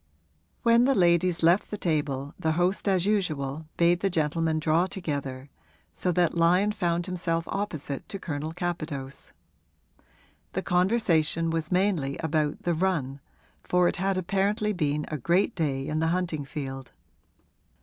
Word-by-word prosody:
When 235 Hz, +1 st, +5 dB
the 270 Hz, 0 st, +3 dB
ladies 175 Hz, -2 st, +3 dB
left 175 Hz, +4 st, +4 dB
the 210 Hz, -, -4 dB
table 145 Hz, -5 st, -1 dB
the 160 Hz, 0 st, +1 dB
host 180 Hz, +5 st, 0 dB
as 190 Hz, -2 st, +2 dB
usual 155 Hz, -8 st, -1 dB
bade 170 Hz, +1 st, +4 dB
the 195 Hz, -, +1 dB
gentlemen 160 Hz, -1 st, 0 dB
draw 160 Hz, +3 st, +2 dB
together, 140 Hz, -7 st, -5 dB, 0.4 s
so 180 Hz, -, -1 dB
that 175 Hz, -1 st, +2 dB
Lyon 180 Hz, +5 st, +3 dB
found 175 Hz, -3 st, -1 dB
himself 170 Hz, -2 st, -2 dB
opposite 155 Hz, -9 st, -4 dB
to 195 Hz, -, -4 dB
Colonel 155 Hz, -4 st, -4 dB
Capadose. 155 Hz, -6 st, -5 dB, 1.2 s
The -, -, -2 dB
conversation 175 Hz, -4 st, +2 dB
was 165 Hz, 0 st, -2 dB
mainly 180 Hz, -7 st, +1 dB
about 155 Hz, -2 st, -1 dB
the 175 Hz, -, +1 dB
'run,' 160 Hz, -6 st, -1 dB, 0.4 s
for 180 Hz, 0 st, +2 dB
it -, -, -1 dB
had 190 Hz, +1 st, 0 dB
apparently 200 Hz, +3 st, 0 dB
been 150 Hz, -4 st, -1 dB
a 155 Hz, -, -3 dB
great 175 Hz, -, +2 dB
day 140 Hz, -6 st, -1 dB
in 155 Hz, 0 st, -1 dB
the 160 Hz, -, +1 dB
hunting 165 Hz, -4 st, -1 dB
field. 135 Hz, -2 st, -6 dB
170 Hz, 145 wpm, -27 LUFS, 150-185 Hz, 1.2 s, When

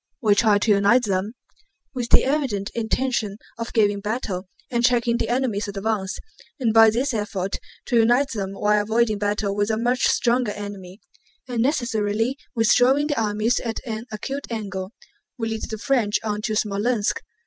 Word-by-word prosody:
We 215 Hz, -4 st, +4 dB
tried 205 Hz, -1 st, +3 dB
to 220 Hz, -, +3 dB
unite 205 Hz, +5 st, +4 dB
them, 200 Hz, 0 st, -1 dB, 0.6 s
with 245 Hz, -3 st, -3 dB
the -, -, +6 dB
evident 260 Hz, -9 st, -1 dB
intention 225 Hz, -2 st, -1 dB, 0.2 s
of 230 Hz, -, -4 dB
giving 205 Hz, -2 st, +2 dB
battle 205 Hz, -4 st, -3 dB, 0.2 s
and 240 Hz, -1 st, 0 dB
checking 235 Hz, -1 st, +3 dB
the 225 Hz, -, -2 dB
enemy's 240 Hz, -5 st, 0 dB
advance, 200 Hz, -1 st, -2 dB, 0.4 s
and 230 Hz, -4 st, +1 dB
by 225 Hz, -1 st, +8 dB
this 250 Hz, +5 st, 0 dB
effort 200 Hz, -3 st, -2 dB, 0.3 s
to 240 Hz, -, +1 dB
unite 245 Hz, +5 st, +3 dB
them 195 Hz, -3 st, -3 dB
while 210 Hz, +1 st, +2 dB
avoiding 220 Hz, 0 st, +1 dB
battle 205 Hz, -1 st, -1 dB
with 205 Hz, +1 st, 0 dB
a 220 Hz, -, +1 dB
much 245 Hz, +2 st, +1 dB
stronger 240 Hz, -3 st, +1 dB
enemy, 200 Hz, -2 st, -8 dB, 0.5 s
and 245 Hz, -2 st, -1 dB
necessarily 230 Hz, -3 st, 0 dB, 0.2 s
withdrawing 245 Hz, +5 st, +4 dB
the 290 Hz, -5 st, 0 dB
armies 215 Hz, +2 st, +1 dB
at 230 Hz, -2 st, -4 dB
an 225 Hz, -1 st, -5 dB
acute 270 Hz, +6 st, -5 dB
angle—we 220 Hz, +2 st, -7 dB
led 220 Hz, -1 st, -4 dB
the 220 Hz, -, -4 dB
French 230 Hz, -3 st, 0 dB
on 210 Hz, -1 st, -2 dB
to 220 Hz, -, -1 dB
Smolénsk. 210 Hz, +1 st, 0 dB
220 Hz, 160 wpm, -23 LUFS, 205-240 Hz, 0.6 s, by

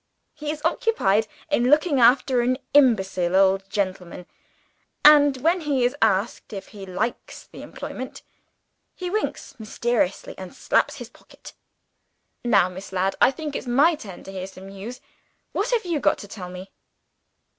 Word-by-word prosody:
He 300 Hz, 0 st, -6 dB
is 300 Hz, 0 st, -4 dB
occupied 225 Hz, -, +1 dB, 0.2 s
in 245 Hz, -3 st, +2 dB
looking 295 Hz, -1 st, +3 dB
after 250 Hz, +1 st, +4 dB
an 255 Hz, +2 st, +1 dB, 0.2 s
imbecile 190 Hz, -10 st, +3 dB
old 195 Hz, 0 st, +3 dB
gentleman; 185 Hz, -3 st, -3 dB, 0.8 s
and, 290 Hz, -2 st, +7 dB
when 335 Hz, +7 st, +1 dB
he 285 Hz, -5 st, 0 dB
is 250 Hz, +3 st, 0 dB
asked 210 Hz, 0 st, 0 dB
if 195 Hz, -, -7 dB
he 200 Hz, -2 st, -10 dB
likes 205 Hz, +6 st, -4 dB
the -, -, -12 dB
employment, -, -, -8 dB, 0.7 s
he 360 Hz, -1 st, -5 dB
winks 430 Hz, +2 st, -3 dB
mysteriously 220 Hz, -2 st, -1 dB
and 185 Hz, -1 st, -9 dB
slaps -, -, +1 dB
his -, -, -9 dB
pocket. -, -, -16 dB, 0.9 s
Now, 205 Hz, -7 st, +4 dB
Miss 185 Hz, +2 st, -9 dB
Ladd, 190 Hz, +1 st, 0 dB
I -, -, +7 dB
think 295 Hz, +2 st, -6 dB
it's -, -, -5 dB
my 280 Hz, +8 st, +4 dB
turn 205 Hz, -, -9 dB
to 195 Hz, -, -9 dB
hear 190 Hz, -1 st, -6 dB
some 190 Hz, 0 st, -12 dB
news. 205 Hz, +6 st, -9 dB, 0.5 s
What 415 Hz, -, -1 dB
have 470 Hz, -5 st, 0 dB
you 335 Hz, -4 st, -1 dB
got -, -, +2 dB
to 205 Hz, -, -10 dB
tell 185 Hz, -3 st, -8 dB
me?" 185 Hz, +1 st, -10 dB
230 Hz, 155 wpm, -23 LUFS, 195-290 Hz, 0.9 s, and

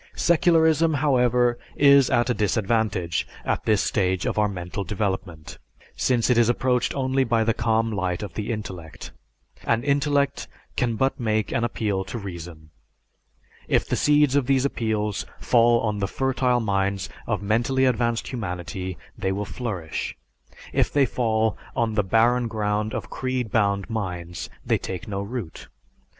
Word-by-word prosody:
Secularism, 165 Hz, -2 st, +3 dB
however, 125 Hz, -4 st, +2 dB, 0.2 s
is 140 Hz, -2 st, +6 dB
at 120 Hz, +1 st, +2 dB
a -, -, +2 dB
disadvantage 105 Hz, -4 st, 0 dB, 0.2 s
at -, -, -1 dB
this 105 Hz, -3 st, +3 dB
stage 95 Hz, -3 st, 0 dB
of -, -, 0 dB
our 105 Hz, -, +3 dB
mental 90 Hz, +1 st, -5 dB
development, 95 Hz, -6 st, -4 dB, 0.4 s
since 120 Hz, -3 st, +1 dB
it 120 Hz, -, +4 dB
is 120 Hz, -1 st, +4 dB
approached 125 Hz, 0 st, +1 dB
only 135 Hz, 0 st, +1 dB
by 115 Hz, -2 st, +2 dB
the 115 Hz, 0 st, +2 dB
calm 115 Hz, -1 st, +1 dB
light 95 Hz, -2 st, -2 dB
of 100 Hz, -5 st, -7 dB
the 105 Hz, +3 st, -3 dB
intellect. 95 Hz, -7 st, -7 dB, 0.5 s
And 115 Hz, +1 st, +1 dB
intellect 140 Hz, 0 st, +1 dB, 0.3 s
can 115 Hz, -2 st, 0 dB
but 135 Hz, +4 st, 0 dB
make 110 Hz, -3 st, 0 dB
an 115 Hz, -, 0 dB
appeal 105 Hz, -4 st, -1 dB
to 120 Hz, -, -5 dB
reason. 85 Hz, -6 st, -8 dB, 1.0 s
If -, -, +1 dB
the -, -, 0 dB
seeds 150 Hz, -2 st, +3 dB
of 140 Hz, -3 st, +2 dB
these 135 Hz, -1 st, +3 dB
appeals 110 Hz, -6 st, -1 dB
fall 120 Hz, -1 st, +4 dB
on 105 Hz, -2 st, -1 dB
the 100 Hz, -, 0 dB
fertile 125 Hz, +1 st, +1 dB
minds 100 Hz, -2 st, 0 dB, 0.2 s
of -, -, -1 dB
mentally 120 Hz, +6 st, +2 dB
advanced 120 Hz, -2 st, 0 dB
humanity, 90 Hz, -, -5 dB, 0.2 s
they 95 Hz, -, -1 dB
will 100 Hz, +2 st, -2 dB
flourish; 100 Hz, -10 st, -4 dB, 0.6 s
if -, -, +2 dB
they 140 Hz, -2 st, +4 dB
fall 110 Hz, -3 st, 0 dB, 0.2 s
on 115 Hz, -2 st, 0 dB
the 105 Hz, -, +2 dB
barren 115 Hz, +5 st, +3 dB
ground 105 Hz, -1 st, -1 dB
of -, -, -5 dB
creed 130 Hz, -4 st, -2 dB
bound 100 Hz, -2 st, +1 dB
minds, 90 Hz, -7 st, -4 dB, 0.2 s
they -, -, +2 dB
take 90 Hz, -3 st, -6 dB
no 100 Hz, -2 st, -3 dB
root. 100 Hz, -4 st, -6 dB
110 Hz, 155 wpm, -24 LUFS, 100-125 Hz, 1.0 s, is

